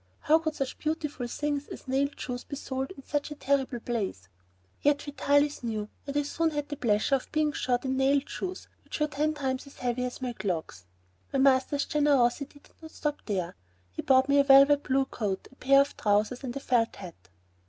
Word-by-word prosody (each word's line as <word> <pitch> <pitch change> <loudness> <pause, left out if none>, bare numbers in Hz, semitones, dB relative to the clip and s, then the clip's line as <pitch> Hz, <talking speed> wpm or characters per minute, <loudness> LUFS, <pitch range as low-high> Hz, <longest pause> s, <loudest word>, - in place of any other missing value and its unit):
How 315 +2 +4
could 315 -1 -3
such 270 -3 -4
beautiful 305 -5 -2
things 290 +3 -2
as - - -10
nailed 275 +2 0
shoes 250 -1 -4
be - - -7
sold 265 -1 -4
in 275 - -11
such 290 +1 -2
a 295 - -6
terrible 270 -3 0
place? 200 - -3 0.5
Yet 290 0 +2
Vitalis 285 0 +1
knew, 215 -3 -3 0.2
and 285 +1 0
soon 330 +3 0
I - - -8
had 295 0 -2
the 290 - -3
pleasure 225 -1 +1
of 270 - 0
being 305 -1 +1
shod 250 -2 -1
in 265 0 0
nailed 275 +1 +2
shoes 370 -1 -5 0.2
which - - -6
were 300 - +3
ten 300 +1 -1
times 265 -1 -2
as 280 - -15
heavy 250 0 -1
as 250 0 -4
my 250 -2 -3
clogs. 170 - -4 0.5
My - - 0
master's 270 +1 +3
generosity 285 -1 +1
did - - -23
not 320 - -9
stop 295 -1 -3
there. 185 -5 -2 0.4
He 90 - -5
bought 260 0 +4
me 280 0 +4
a - - +6
blue 275 0 +8
velvet 275 -2 +1
coat, 200 -4 -3
a - - -19
pair 275 +1 +5
of 280 - -2
trousers, 215 +4 +1
and 245 -2 -5
a - - -2
felt 240 -4 +1
hat. 170 - -11
270 Hz, 205 wpm, -28 LUFS, 245-290 Hz, 0.5 s, blue